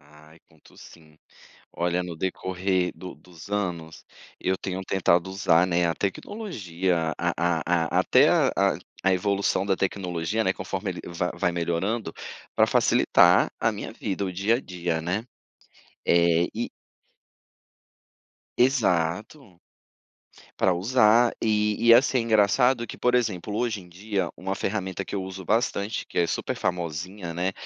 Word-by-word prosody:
Ai, 75 Hz, +2 st, -19 dB
conto 80 Hz, -1 st, -22 dB
sim, 80 Hz, -2 st, -16 dB, 0.5 s
olha, 90 Hz, +1 st, -1 dB
no 85 Hz, -2 st, -6 dB
decorrer 95 Hz, +1 st, -1 dB
do 90 Hz, -1 st, -9 dB
dos 90 Hz, +1 st, -15 dB
anos, 90 Hz, -6 st, -4 dB, 0.3 s
eu 95 Hz, +1 st, 0 dB
tenho 95 Hz, 0 st, -4 dB
tentado 90 Hz, -2 st, +2 dB
usar, 90 Hz, -3 st, +3 dB
né, 85 Hz, -1 st, +1 dB
a 80 Hz, -, -1 dB
tecnologia, 95 Hz, -, -2 dB
a -, -, 0 dB
a 85 Hz, 0 st, +1 dB
a -, -, +6 dB
até -, -, +5 dB
a -, -, +3 dB, 0.5 s
a 95 Hz, -, +4 dB
evolução 100 Hz, +1 st, 0 dB
da 100 Hz, -1 st, +1 dB
tecnologia, 95 Hz, +2 st, -2 dB
né, 95 Hz, -2 st, +1 dB
conforme -, -, -4 dB
ele -, -, -8 dB
va 85 Hz, +1 st, -2 dB
vai 85 Hz, 0 st, 0 dB
melhorando 85 Hz, +6 st, -2 dB, 0.4 s
pra -, -, +4 dB
facilitar -, -, +4 dB
a -, -, +2 dB
minha -, -, -6 dB
vida, 100 Hz, 0 st, -4 dB
o 95 Hz, -, -2 dB
dia 100 Hz, +5 st, +1 dB
a 125 Hz, -, -4 dB
dia, 85 Hz, -5 st, -3 dB
né, 95 Hz, +7 st, -2 dB, 0.8 s
eh, 85 Hz, 0 st, +3 dB
e -, -, -3 dB, 1.9 s
Exato. 105 Hz, -, 0 dB, 1.0 s
Pra 95 Hz, -, +3 dB
usar 115 Hz, +4 st, +4 dB
e 105 Hz, -1 st, +1 dB
e, 115 Hz, -, +9 dB
assim, 130 Hz, +2 st, +4 dB
engraçado 115 Hz, +2 st, +3 dB
que, -, -, -9 dB
por 125 Hz, 0 st, +1 dB
exemplo, 105 Hz, -5 st, -1 dB
hoje 115 Hz, -3 st, -1 dB
em 90 Hz, -, -15 dB
dia, 95 Hz, +1 st, -3 dB
uma 95 Hz, +1 st, -4 dB
ferramenta 95 Hz, -2 st, -3 dB
que -, -, -7 dB
eu 100 Hz, -, -2 dB
uso 95 Hz, 0 st, -7 dB
bastante, 105 Hz, -1 st, 0 dB
que -, -, -5 dB
é 85 Hz, -, +3 dB
super 80 Hz, -, -3 dB
famosinha, 85 Hz, +2 st, -4 dB
né, 90 Hz, +3 st, -1 dB
95 Hz, 145 wpm, -25 LUFS, 85-105 Hz, 1.9 s, e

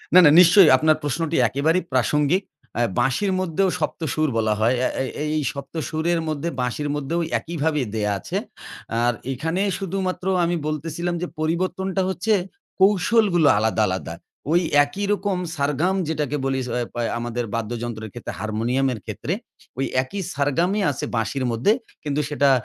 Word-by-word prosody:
না, -, -, +11 dB
না 145 Hz, -, +8 dB
নিশ্চয়ই, 180 Hz, -1 st, +8 dB
আপনার 155 Hz, +2 st, +3 dB
প্রশ্নটি 155 Hz, +3 st, -1 dB
একেবারেই 160 Hz, +8 st, +1 dB
প্রাসঙ্গিক। 150 Hz, -, +2 dB, 0.4 s
আ -, -, +3 dB, 0.2 s
বাঁশির 135 Hz, +11 st, +1 dB
মধ্যেও 185 Hz, +1 st, +1 dB
সপ্ত -, -, -3 dB
সুর 155 Hz, -2 st, +1 dB
বলা 110 Hz, -1 st, +2 dB
হয়। 120 Hz, +3 st, +3 dB
আ -, -, +2 dB
এ -, -, -2 dB, 0.3 s
এই 150 Hz, -, 0 dB
সপ্ত 140 Hz, +1 st, -8 dB, 0.2 s
সুরের 165 Hz, +2 st, 0 dB
মধ্যে, 155 Hz, +2 st, -2 dB
বাঁশির 145 Hz, +4 st, -2 dB
মধ্যেও 150 Hz, +4 st, -2 dB, 0.2 s
একইভাবে 160 Hz, -3 st, -1 dB
দেয়া 105 Hz, -1 st, 0 dB
আছে। -, -, -4 dB, 0.7 s
আর 120 Hz, 0 st, +3 dB, 0.2 s
এখানে 160 Hz, +8 st, -2 dB, 0.2 s
শুধুমাত্র 190 Hz, -1 st, -3 dB, 0.2 s
আমি 175 Hz, +1 st, +1 dB
বলতেছিলাম 165 Hz, +3 st, -2 dB
যে 180 Hz, -, -2 dB
পরিবর্তনটা 185 Hz, +4 st, -1 dB
হচ্ছে, 205 Hz, +4 st, 0 dB, 0.5 s
কৌশলগুলো 195 Hz, -3 st, +4 dB
আলাদা, 110 Hz, 0 st, +1 dB
আলাদা। 95 Hz, -3 st, -3 dB, 0.4 s
ওই 175 Hz, +2 st, +4 dB, 0.2 s
একই 195 Hz, +8 st, -4 dB
রকম 200 Hz, -2 st, -1 dB, 0.2 s
সারগাম 150 Hz, +6 st, 0 dB
যেটাকে 150 Hz, -2 st, -1 dB
বলি 135 Hz, 0 st, 0 dB
স -, -, -7 dB
অয় 120 Hz, -, -2 dB
পা 120 Hz, -, -3 dB, 0.2 s
আমাদের 120 Hz, 0 st, -3 dB
বাদ্যযন্ত্রের 115 Hz, -1 st, -4 dB
ক্ষেত্রে, -, -, -6 dB
হারমোনিয়ামের 115 Hz, +3 st, 0 dB
ক্ষেত্রে, -, -, -3 dB, 0.4 s
ঐ -, -, -6 dB, 0.2 s
একই 195 Hz, +9 st, -5 dB
সারগামই 170 Hz, +9 st, +1 dB
আছে 130 Hz, -, -4 dB
বাঁশির 125 Hz, +4 st, -1 dB
মধ্যে। 115 Hz, -, +2 dB, 0.3 s
কিন্তু 150 Hz, 0 st, 0 dB
সেটা 140 Hz, -1 st, +3 dB
150 Hz, 155 wpm, -23 LUFS, 130-180 Hz, 0.7 s, না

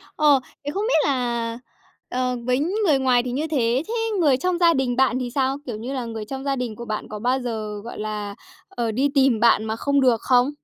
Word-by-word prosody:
Ờ, 295 Hz, -3 st, +5 dB, 0.3 s
thế 290 Hz, -, -2 dB
không 400 Hz, -, -1 dB
biết 315 Hz, -11 st, +3 dB
là 235 Hz, -3 st, -1 dB, 0.5 s
ờ 250 Hz, 0 st, -1 dB
với 250 Hz, +1 st, +2 dB
người 345 Hz, -2 st, +1 dB
ngoài 250 Hz, -2 st, +3 dB
thì 250 Hz, -, -4 dB
như 295 Hz, +5 st, -2 dB
thế, 255 Hz, -3 st, +1 dB
thế 455 Hz, -, -4 dB, 0.3 s
người 285 Hz, -7 st, +4 dB
trong 360 Hz, +4 st, 0 dB
gia 340 Hz, -1 st, +5 dB
đình 255 Hz, -3 st, 0 dB
bạn 255 Hz, -1 st, +2 dB
thì 250 Hz, -1 st, -3 dB
sao? 270 Hz, 0 st, +1 dB
Kiểu 235 Hz, -4 st, -5 dB
như 245 Hz, +5 st, -5 dB
là 255 Hz, -3 st, -3 dB
người 225 Hz, -2 st, -5 dB
trong 265 Hz, +4 st, -6 dB
gia 275 Hz, -1 st, 0 dB
đình 245 Hz, -4 st, -4 dB
của 235 Hz, -, -8 dB
bạn 215 Hz, -2 st, -4 dB
có 210 Hz, -, -6 dB
bao 250 Hz, +4 st, +1 dB
giờ, 215 Hz, -4 st, -4 dB
gọi 235 Hz, -, -8 dB
là, 210 Hz, -1 st, -4 dB, 0.3 s
ờ, 235 Hz, -2 st, -2 dB
đi 270 Hz, +6 st, +1 dB
tìm 265 Hz, -4 st, +4 dB
bạn 220 Hz, -1 st, +4 dB
mà 220 Hz, -, -2 dB
không 280 Hz, +4 st, +1 dB
được 245 Hz, -4 st, +3 dB
không? 250 Hz, +2 st, +3 dB
250 Hz, 235 wpm, -23 LUFS, 230-275 Hz, 0.5 s, Ờ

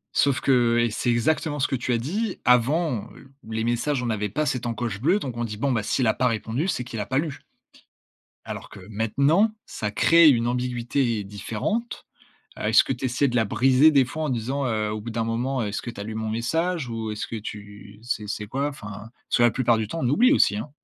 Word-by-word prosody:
Sauf 140 Hz, -2 st, +2 dB
que 120 Hz, -3 st, +3 dB
et 120 Hz, -2 st, +1 dB
c'est 120 Hz, -, -1 dB
exactement 145 Hz, +5 st, +1 dB
ce 130 Hz, -, +2 dB
que 135 Hz, -, -1 dB
tu 125 Hz, 0 st, -2 dB
as -, -, +2 dB
dit 190 Hz, -, -3 dB
avant, 125 Hz, +1 st, +2 dB
heu, 135 Hz, 0 st, -16 dB, 0.2 s
les 110 Hz, 0 st, -2 dB
messages, 120 Hz, +3 st, 0 dB
on -, -, -2 dB
n'avait 105 Hz, -3 st, -1 dB
pas 150 Hz, +8 st, -1 dB
cette 125 Hz, -3 st, -2 dB
encoche 115 Hz, -3 st, -3 dB
bleue. 180 Hz, +9 st, +3 dB
Donc 125 Hz, -, -5 dB
on 120 Hz, -, -1 dB
dit: 105 Hz, -2 st, -5 dB
«Bon, 135 Hz, +2 st, 0 dB
s'il 120 Hz, +3 st, 0 dB
a -, -, +4 dB
pas 125 Hz, -, +1 dB
répondu, 115 Hz, -, -1 dB
c'est 125 Hz, -, -1 dB
qu'il 115 Hz, -2 st, -7 dB
a 105 Hz, -, -2 dB
pas 130 Hz, -, 0 dB
lu». 150 Hz, -2 st, -2 dB, 1.1 s
Alors -, -, -6 dB
que 105 Hz, -, -11 dB
maintenant, 140 Hz, -, +2 dB, 0.2 s
ça 105 Hz, -1 st, -4 dB
crée 165 Hz, +8 st, +6 dB
une 120 Hz, -4 st, +3 dB
ambiguïté 120 Hz, -2 st, -1 dB
différente. 110 Hz, -, -4 dB, 0.5 s
Heu, -, -, -6 dB
est-ce 110 Hz, +2 st, +5 dB
que -, -, -4 dB
tu 130 Hz, +1 st, -3 dB
essaies 130 Hz, +3 st, +1 dB
de 125 Hz, -, -2 dB
la 115 Hz, -2 st, +3 dB
briser 135 Hz, +8 st, +4 dB
des 140 Hz, -3 st, +5 dB
fois 155 Hz, +5 st, -5 dB
en 150 Hz, -, -1 dB
disant, 130 Hz, +3 st, -2 dB
heu, 110 Hz, -3 st, -1 dB
au 110 Hz, -, -3 dB
bout 115 Hz, +2 st, -6 dB
d'un 115 Hz, 0 st, -1 dB
moment, 120 Hz, +3 st, -1 dB
heu: 105 Hz, -, -1 dB
«Est-ce 100 Hz, -, -4 dB
que 120 Hz, -, -5 dB
tu 100 Hz, -, -8 dB
as -, -, -4 dB
lu 110 Hz, +1 st, -6 dB
mon 110 Hz, 0 st, -3 dB
message?» 160 Hz, +6 st, -1 dB
ou 110 Hz, -1 st, -4 dB
«Est-ce 105 Hz, -, -4 dB
que 115 Hz, -, -6 dB
tu 105 Hz, -1 st, -9 dB
c'est 110 Hz, -3 st, -3 dB
c'est 105 Hz, 0 st, -4 dB
quoi?» 135 Hz, +5 st, -1 dB
enfin. 105 Hz, -3 st, -9 dB, 0.2 s
Parce -, -, +2 dB
que 120 Hz, -, +4 dB
la 120 Hz, -, +5 dB
plupart 120 Hz, -3 st, +2 dB
du 110 Hz, -2 st, -2 dB
temps, 165 Hz, -, -5 dB
on 125 Hz, -, +1 dB
oublie 250 Hz, -, +5 dB
aussi, 105 Hz, -, +3 dB
hein. 115 Hz, +7 st, -5 dB
120 Hz, 240 wpm, -24 LUFS, 110-140 Hz, 1.1 s, crée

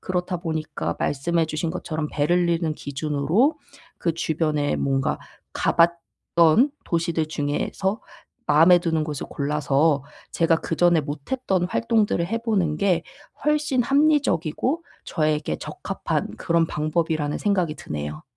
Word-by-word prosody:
그렇다 180 Hz, 0 st, -2 dB
보니까 155 Hz, -, -3 dB
말씀해 165 Hz, +4 st, 0 dB
주신 160 Hz, +1 st, -2 dB
것처럼 160 Hz, -3 st, -3 dB
베를린을 170 Hz, +1 st, +1 dB
기준으로 150 Hz, -, 0 dB, 0.4 s
그 170 Hz, -, 0 dB
주변에 155 Hz, -3 st, 0 dB
뭔가 135 Hz, -1 st, 0 dB, 0.4 s
가봤던 170 Hz, -, +2 dB
도시들 165 Hz, -2 st, 0 dB
중에서 155 Hz, +7 st, -2 dB, 0.5 s
마음에 165 Hz, +4 st, +6 dB
드는 165 Hz, -2 st, 0 dB
곳을 150 Hz, -2 st, -5 dB
골라서 145 Hz, 0 st, +1 dB, 0.3 s
제가 165 Hz, -1 st, +3 dB
그전에 170 Hz, 0 st, +2 dB
못했던 175 Hz, -, -2 dB
활동들을 215 Hz, -4 st, +1 dB
해 225 Hz, +5 st, -1 dB
보는 200 Hz, -10 st, 0 dB
게 180 Hz, -2 st, +2 dB, 0.4 s
훨씬 300 Hz, -4 st, +2 dB
합리적이고 280 Hz, -, +1 dB, 0.2 s
저에게 155 Hz, -, 0 dB
적합한 -, -, -4 dB
그런 165 Hz, 0 st, +2 dB
방법이라는 155 Hz, -1 st, -1 dB
생각이 185 Hz, -7 st, 0 dB
드네요. 75 Hz, 0 st, -6 dB
165 Hz, 290 characters per minute, -24 LUFS, 150-185 Hz, 0.5 s, 마음에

